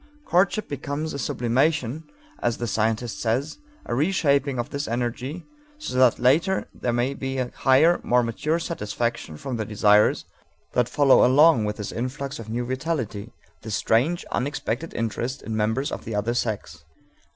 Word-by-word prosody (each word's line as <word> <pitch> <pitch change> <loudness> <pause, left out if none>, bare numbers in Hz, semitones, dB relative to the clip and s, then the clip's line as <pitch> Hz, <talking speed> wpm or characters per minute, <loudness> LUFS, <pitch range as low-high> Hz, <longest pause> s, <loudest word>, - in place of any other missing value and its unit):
Courtship 195 +4 +2
becomes 145 +2 -4
a 140 - -4
sublimation, 130 +4 0 0.4
as 120 - 0
the 120 - -3
scientist 110 +1 -1
says, 130 - -1 0.3
a - - -3
reshaping 140 -2 +1
of 120 - -3
this 140 +1 -3
energy 125 +7 -3 0.3
so 305 - -6
that 130 -3 +5
later 160 +10 +2
there 120 - -2
may 120 +3 0
be 135 -1 -4
a 125 -1 -2
higher, 150 +6 +4
more 125 0 +2
mature 150 +8 -1
satisfaction 120 - -3
of 130 -3 -2
the 110 - -1
desires 105 0 +3 0.5
that 125 -1 +2
follow 140 -2 +5
along 135 -3 +5
with 105 0 -3
this 105 -2 -5
influx 135 +3 -4
of 110 -1 -8
new 120 +2 -2
vitality, 130 -5 -3 0.3
this 110 -3 -3
strange, 135 - +1
unexpected 140 +2 -2
interest 120 +4 -3
in 110 - -4
members 110 +7 0
of - - -5
the 110 - -5
other 110 +3 0
sex. 105 -10 -3
125 Hz, 160 wpm, -24 LUFS, 115-145 Hz, 0.5 s, that